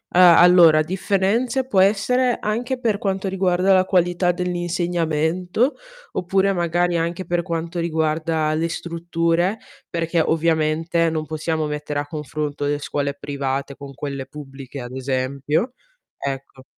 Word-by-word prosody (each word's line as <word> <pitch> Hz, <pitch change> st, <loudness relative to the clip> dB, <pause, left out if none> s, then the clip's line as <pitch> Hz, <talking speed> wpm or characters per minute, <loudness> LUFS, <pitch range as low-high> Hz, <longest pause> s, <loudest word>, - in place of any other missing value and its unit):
ah, 180 Hz, -2 st, +8 dB
allora 170 Hz, -3 st, +7 dB
differenze 200 Hz, +9 st, 0 dB
può 195 Hz, -7 st, +2 dB
essere 240 Hz, +6 st, +3 dB
anche 240 Hz, +5 st, -1 dB
per 215 Hz, -4 st, +1 dB
quanto 195 Hz, -1 st, -2 dB
riguarda 185 Hz, 0 st, +1 dB
la 185 Hz, -1 st, +5 dB
qualità 175 Hz, -1 st, +2 dB
dell'insegnamento, 175 Hz, -, -1 dB, 0.4 s
oppure 190 Hz, +2 st, +1 dB
magari 175 Hz, -1 st, +1 dB
anche 170 Hz, +3 st, -2 dB
per 175 Hz, 0 st, -1 dB
quanto 170 Hz, 0 st, -3 dB
riguarda 160 Hz, -1 st, 0 dB
le 165 Hz, +1 st, 0 dB
strutture 170 Hz, +3 st, -1 dB, 0.3 s
perché 165 Hz, 0 st, -1 dB
ovviamente 165 Hz, +1 st, +1 dB
non 155 Hz, -1 st, -2 dB
possiamo 155 Hz, +1 st, -2 dB
mettere 150 Hz, -1 st, -3 dB
a 145 Hz, -, -4 dB
confronto 150 Hz, -1 st, -4 dB
le 145 Hz, 0 st, 0 dB
scuole 140 Hz, -1 st, -2 dB
private 140 Hz, -1 st, -3 dB
con 140 Hz, -1 st, -9 dB
quelle 140 Hz, -1 st, -5 dB
pubbliche 135 Hz, -2 st, -9 dB
ad 120 Hz, 0 st, -8 dB
esempio. 135 Hz, -, -1 dB, 0.5 s
Ecco. 135 Hz, -1 st, -5 dB
165 Hz, 130 wpm, -21 LUFS, 150-185 Hz, 0.5 s, ah